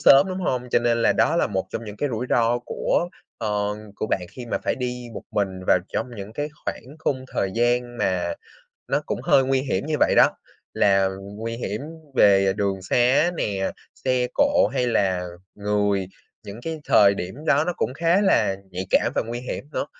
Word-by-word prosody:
sớm, 140 +4 +7
đúng 185 0 -3
hông? 125 -7 -1
Cho - - +4
nên 120 -1 +1
là - - +4
đó - - +2
là - - +3
một 95 -3 -2
trong 115 - -4
những 105 -1 -8
cái 145 - -1
rủi 120 0 -3
ro 120 0 +3
của, 145 +7 -1 0.3
ở, 105 -1 -1 0.2
của - - -2
bạn 90 -4 -1
khi 120 +3 -9
mà - - -1
phải - - +1
đi 125 -1 -4
một - - -6
mình 95 -2 -1
vào - - +5
trong - - -1
những 100 +2 -7
cái 145 +5 -3 0.2
khoảng 135 +6 -6
khung 130 -4 -1
thời 95 - 0
gian 120 +1 +1
mà 90 -2 0 0.5
nó - - +1
cũng - - -2
hơi 135 - +4
nguy 130 0 +2
hiểm 130 -7 -2
như 155 - -1
vậy - - +4
đó, - - +7 0.4
là 95 -1 +4 0.3
nguy 115 +2 -4
hiểm 105 -2 -4 0.3
về 95 -4 +5
đường 100 -2 -1
sá 125 - +3
nè, 95 -8 -1 0.3
xe 130 -1 +2
cộ 285 0 +4
hay 125 - +1
là 95 -6 +1 0.3
người. 100 -2 0 0.4
Những 100 +3 -8
cái 160 +1 -4
thời 100 -1 +5
điểm 95 +1 -5
đó 145 0 +4
nó 175 - -1
cũng 130 - -1
khá 170 +6 +3
là 100 - +3
nhạy 95 +1 -4
cảm - - +3
và - - +1
nguy 120 +1 -4
hiểm 125 - -5
nữa. - - -2
115 Hz, 205 wpm, -24 LUFS, 100-130 Hz, 0.5 s, sớm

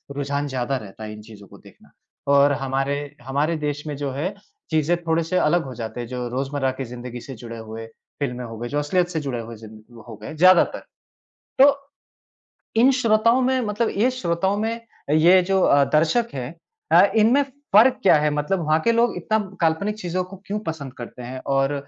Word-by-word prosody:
रुझान 145 +1 -2
ज़्यादा 130 0 -2
रहता 110 -2 -10
है 105 0 -6
इन 105 - -10
चीज़ों 105 -2 -14
को - - -15
देखना। - - -19 0.4
और 140 +1 +5
हमारे, 140 +2 -2
हमारे 145 +5 0
देश 150 0 -3
में 145 - -3
जो 140 -2 -3
है 160 +9 -3 0.4
चीज़ें 160 +2 +2
थोड़े 165 0 +1
से 180 +3 -1
अलग 170 +1 +2
हो 130 - -7
जाते 115 0 -6
हैं। 120 - -6
जो 125 0 -4
रोजमर्रा 135 +1 -1
की 135 - -3
ज़िन्दगी 120 0 -8
से 135 - -9
जुड़े 115 0 -9
हुए 110 0 -8 0.3
फिल्में 125 -3 -3
हो 115 -1 -8
गए, 120 +1 -5
जो 145 - -1
असलियत 175 +4 +1
से 160 - -2
जुड़े 135 -4 -3
हुए 115 0 -8
ज़िं 110 +1 -14
हो 115 - -8
गए, 130 - -7
ज़्यादातर। 185 +2 +5 0.8
तो, 280 +1 +7 1.0
इन 245 +4 +5
श्रोताओं 230 -1 +3
में 260 0 +2
मतलब 210 +2 0
ये 240 +5 +3
श्रोताओं 190 -4 -1
में 225 +2 -2 0.3
ये 170 +4 +6
जो 190 +1 +1
अ, 140 0 +5
दर्शक 165 +10 +3
है 130 -1 -4 0.4
अ, - - +8
इनमें 230 +6 +4 0.3
फ़र्क 240 +5 +6
क्या 190 - +6
है? 150 - +2
मतलब 150 +6 -1
वहाँ 155 +1 +3
के 230 - +5
लोग 230 0 +2
इतना 215 +5 0 0.2
काल्पनिक 170 +6 +1
चीज़ों 180 0 -2
को 190 +1 -11
क्यों 210 +1 -3
पसंद 145 -5 -5
करते 120 +1 -9
हैं। 130 +2 -6 0.2
और 135 +1 +2
145 Hz, 200 wpm, -22 LUFS, 125-185 Hz, 1.0 s, अ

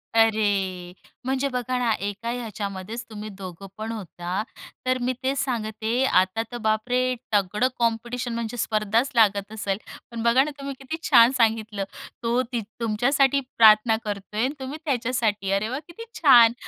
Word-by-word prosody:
अरे! 200 -5 +2 0.3
म्हणजे 265 +1 0
बघा 250 0 -1
ना, 240 -2 +1
एका 205 +4 -3
याच्यामध्येच 215 -2 -5
तुम्ही 215 -1 -7
दोघं 190 0 -8
पण 220 +1 -4
होता. 185 -3 -4 0.4
तर 255 0 +2
मी 250 +1 0
तेच 270 +1 0
सांगते, 225 -1 -1
आता 190 -1 +2
तर, 240 - -4
बाप 220 +1 0
रे! 255 +1 +2 0.2
तगडं 210 +5 +2
कॉम्पिटिशन 235 +1 -1
म्हणजे 235 0 -4
स्पर्धाच 220 +3 +1
लागत 205 -3 +3
असेल. 205 -3 -2 0.3
पण 230 -1 -4
बघा 240 +3 +5
ना, 300 - -4
तुम्ही 275 0 -4
किती 270 +4 -5
छान 235 +2 +7
सांगितलं. 220 -3 +1 0.4
तो 235 +2 +2
तीथं 235 -3 -4 0.2
तुमच्यासाठी 270 +5 +2 0.2
प्रार्थना 220 0 +6
करतोय 210 +2 -3
आणि 270 - 0
तुम्ही 265 +3 -5
त्याच्यासाठी. 230 -7 0
अरे 200 +3 +1
वा! 260 +4 -3
किती 345 +7 -10 0.2
छान. 240 -7 +8
225 Hz, 155 wpm, -24 LUFS, 210-250 Hz, 0.4 s, छान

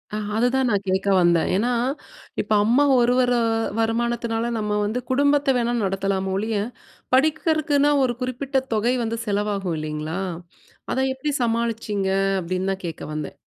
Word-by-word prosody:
அ, - - -1 0.2
அதுதான் 245 +3 +2
நான் 200 -1 0
கேட்க 190 +1 0
வந்தேன், 170 -1 +3
ஏன்னா, 235 +5 +1 0.7
இப்ப - - -10
அம்மா 250 +6 +4 0.2
ஒருவர, 250 +1 +3 0.5
வருமானத்தினால 235 0 0
நம்ம 210 -1 -1
வந்து 225 +4 -1
குடும்பத்த 285 +1 +3
வேணா 240 0 0
நடத்தலாமே 195 0 -1
ஒழிய, 215 +1 -1 0.6
படிக்கிறதுக்குன்னா 305 0 +2
ஒரு 240 -2 0
குறிப்பிட்ட 260 +2 -1
தொகை 230 +4 +2
வந்து 230 +1 -2
செலவாகும் 200 -4 -1
இல்லேங்களா! 155 +3 -4 0.7
அத - - -1
எப்பிடி 285 +3 -3
சமாளிச்சீங்க? 225 -4 -1 0.3
அப்பிடின்னு 185 +2 -2
தான் 190 - -9
கேட்க 165 -2 -6
வந்தேன். 150 -1 -5
225 Hz, 135 wpm, -23 LUFS, 195-255 Hz, 0.7 s, அம்மா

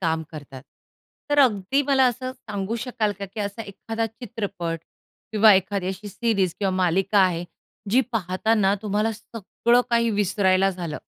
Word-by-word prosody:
काम 160 -2 0
करतात. 140 -4 -10 0.7
तर 290 - +2
अगदी 245 +1 +2
मला 270 -1 +3
असं 255 +1 -2
सांगू 210 -2 -5
शकाल 230 -4 -1
का, 200 - -4
की 200 +3 -7
असा 205 +2 -4
एखादा 225 +3 -4
चित्रपट 205 -7 -5 0.5
किंवा 215 0 +7
एखादी 190 0 0
अशी 195 +2 -6
सीरीज 200 -4 0
किंवा 195 -2 0
मालिका 185 +3 +2
आहे, 180 -3 +2 0.5
जी 245 +5 +5
पाहताना 195 0 +1
तुम्हाला 210 +1 0
सगळं 230 +2 0
काही 235 -1 +3
विसरायला 195 -2 +2
झालं? 175 -5 -5
205 Hz, 145 wpm, -24 LUFS, 185-225 Hz, 0.7 s, किंवा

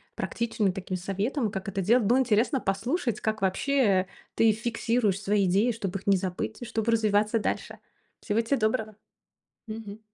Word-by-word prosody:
практичными 225 -4 -1
такими 185 0 -4
советом, 205 +6 -2
как 195 -2 -5
это 195 0 -2
делать. 225 +4 +3
Было 245 +5 +4
интересно 250 +2 +2
послушать, 235 - -1
как 215 -1 -2
вообще 195 -1 +2 0.3
ты 225 -1 +5
фиксируешь 225 -2 0
свои 200 0 +2
идеи, 200 +7 +3
чтоб 200 -4 -4
их 195 - -5
не 195 -1 +5
забыть 185 +5 -4
и - - -5
чтобы 225 0 -1
развиваться 215 0 +2
дальше. 210 - -3 0.4
Всего 220 +1 +1
те 230 +5 0
доброго. 220 -1 -1 0.7
Мгм. 215 -1 -7
215 Hz, 160 wpm, -27 LUFS, 195-230 Hz, 0.7 s, ты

